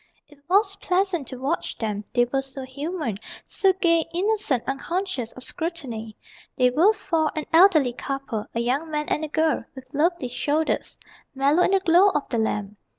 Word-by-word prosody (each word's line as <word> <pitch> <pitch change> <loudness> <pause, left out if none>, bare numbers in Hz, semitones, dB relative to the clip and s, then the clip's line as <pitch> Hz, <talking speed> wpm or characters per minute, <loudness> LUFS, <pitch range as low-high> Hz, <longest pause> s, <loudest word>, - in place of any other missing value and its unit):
It 295 -1 -19
was 395 +1 +3
pleasant 365 -6 0
to 260 - -6
watch 280 +6 -2
them, 210 -2 -3
they 245 -1 +5
were 270 +3 -1
so 270 0 -7
human; 280 - -4 0.3
So 390 -1 +2
gay, 335 -3 +2
innocent, 395 - 0
unconscious 275 - -3
of 255 - -10
scrutiny. 265 -12 -4 0.4
They 250 -1 +4
were 335 +11 +5
four: 325 -7 0
an 310 - -3
elderly 325 -8 +6
couple, 270 -4 -4
A 235 - +1
young 270 +7 -1
man, 300 -1 -1
and 305 - 0
a - - -2
girl 315 -3 +1
with 260 +1 -12
lovely 320 -1 +1
shoulders 295 +5 -1 0.4
Mellow 280 +5 +3
in - - +4
the 390 0 +3
glow 365 +2 +5
of 295 - -1
the 235 - 0
lamp. 210 -2 -2
295 Hz, 175 wpm, -24 LUFS, 255-345 Hz, 0.4 s, elderly